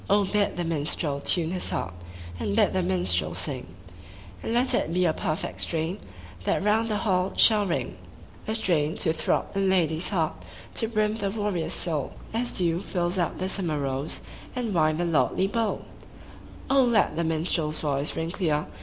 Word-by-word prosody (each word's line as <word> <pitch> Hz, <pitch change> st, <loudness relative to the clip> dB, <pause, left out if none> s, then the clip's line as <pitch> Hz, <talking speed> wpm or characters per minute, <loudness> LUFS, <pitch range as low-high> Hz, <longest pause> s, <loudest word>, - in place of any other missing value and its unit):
BID 205 Hz, 0 st, +2 dB
the 175 Hz, -, 0 dB
minstrel 150 Hz, -2 st, 0 dB
tune 165 Hz, +2 st, +2 dB
his 180 Hz, -1 st, -1 dB
haxp, 90 Hz, -, -2 dB, 0.5 s
And 100 Hz, +4 st, -1 dB
bid -, -, +4 dB
the 190 Hz, -, +2 dB
minstrel 180 Hz, 0 st, 0 dB
sing; 135 Hz, -4 st, -3 dB, 0.7 s
And -, -, -3 dB
let 245 Hz, +3 st, +3 dB
it -, -, +1 dB
be 180 Hz, +1 st, +2 dB
a 160 Hz, -, +3 dB
perfect 155 Hz, +1 st, -3 dB
strain 165 Hz, +4 st, -2 dB, 0.4 s
That -, -, +1 dB
round 220 Hz, +2 st, +2 dB
the 210 Hz, -, +1 dB
hall 190 Hz, -3 st, +1 dB
shall 210 Hz, -3 st, +6 dB
ring: 170 Hz, -, -2 dB, 0.5 s
A 220 Hz, -, 0 dB
strain 160 Hz, -8 st, +1 dB
to 160 Hz, -4 st, +1 dB
throb 165 Hz, -, -1 dB
in 195 Hz, -1 st, +2 dB
lad/s 170 Hz, -2 st, +2 dB
heart, 165 Hz, -6 st, -1 dB, 0.3 s
To 225 Hz, -, 0 dB
brim 215 Hz, -1 st, 0 dB
the 200 Hz, -3 st, -1 dB
warrior's 195 Hz, -5 st, -1 dB
soul. 155 Hz, -6 st, -1 dB, 0.2 s
As 240 Hz, +2 st, -1 dB
dew 170 Hz, -1 st, +1 dB
fills 180 Hz, -1 st, -1 dB
up 170 Hz, -, 0 dB
the 185 Hz, -, -2 dB
summer 175 Hz, -5 st, -2 dB
rose 135 Hz, +1 st, -3 dB, 0.3 s
And 240 Hz, -4 st, -2 dB
wine 155 Hz, -2 st, +3 dB
the 175 Hz, -, 0 dB
lordly 170 Hz, +3 st, +2 dB
bowl! 225 Hz, +2 st, -1 dB, 0.8 s
let 245 Hz, -, +3 dB
the 170 Hz, -, 0 dB
minstrePs 160 Hz, -1 st, 0 dB
voice 145 Hz, -1 st, -1 dB
ring 165 Hz, +1 st, -2 dB
clear. 155 Hz, -6 st, 0 dB
175 Hz, 170 wpm, -26 LUFS, 160-205 Hz, 0.8 s, shall